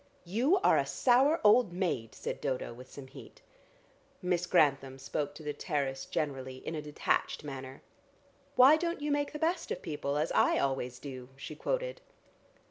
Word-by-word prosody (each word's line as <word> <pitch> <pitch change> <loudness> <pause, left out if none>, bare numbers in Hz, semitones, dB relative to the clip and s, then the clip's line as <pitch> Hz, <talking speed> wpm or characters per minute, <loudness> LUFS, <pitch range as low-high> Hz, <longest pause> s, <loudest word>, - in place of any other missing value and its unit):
"You 245 - +2
are - - +5
a - - 0
sour 270 +6 +4
old 210 -2 +5
maid," 170 - -2
said - - -5
Dodo 125 -2 -2
with 125 +2 -12
some 140 - -10
heat. 130 - -14 0.8
Miss 180 -1 0
Grantham 140 -6 +2
spoke 145 +2 -3
to 155 - -10
the 150 0 -3
terrace 140 -4 -2
generally 130 -3 -3
in - - -3
a 155 - -3
detached 150 0 -1
manner. 135 -2 -8 0.7
"'Why 265 +5 +8
don't 335 -2 -2
you 295 0 -1
make 290 0 0
the 300 - -5
best 330 +2 -1
of - - -4
people 145 -2 -2
as 155 +2 0
I - - +3
always 130 -2 -1
do?'" 130 -3 -8
she 140 +3 -8
quoted. - - -2
150 Hz, 170 wpm, -31 LUFS, -, 0.8 s, Why